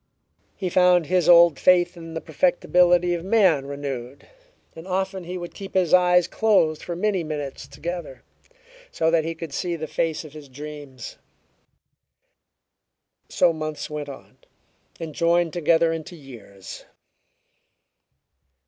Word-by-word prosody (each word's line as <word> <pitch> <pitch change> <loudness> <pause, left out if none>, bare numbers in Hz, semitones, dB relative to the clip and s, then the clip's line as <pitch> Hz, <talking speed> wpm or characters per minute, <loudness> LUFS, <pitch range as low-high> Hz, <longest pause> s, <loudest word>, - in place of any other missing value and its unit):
He 190 - -4
found 180 -1 +4
his 180 +1 +1
old 170 -4 +7
faith 180 -1 +3
in 165 -1 -10
the 160 - -4
perfectibility 175 +1 +2
of 170 -1 -4
man 185 -9 +2
renewed, 140 -2 -6 0.5
and 165 +2 -11
often 190 0 -3
he 180 +2 -5
would 175 -1 -8
keep 195 -2 -10
his 180 -4 +1
eyes 180 -1 +5
closed 190 -8 +1
for 175 - -5
many 190 -1 0
minutes 150 -3 -6
together, 170 -5 -7 0.7
so 160 0 0
that 165 -1 +2
he 165 0 -4
could 160 -3 -8
see 175 +2 -2
the 160 -1 -5
face 160 +1 -2
of 150 - -12
his 150 -3 -12
dreams. 145 -2 -9 2.1
So 170 - +3
months 155 -1 -5
went 150 -1 -5
on, 135 - -12 0.6
and 160 -2 -6
joined 170 +1 +1
together 165 -1 +2
into 165 +2 -7
years. 115 - -12
165 Hz, 135 wpm, -23 LUFS, 150-180 Hz, 2.1 s, old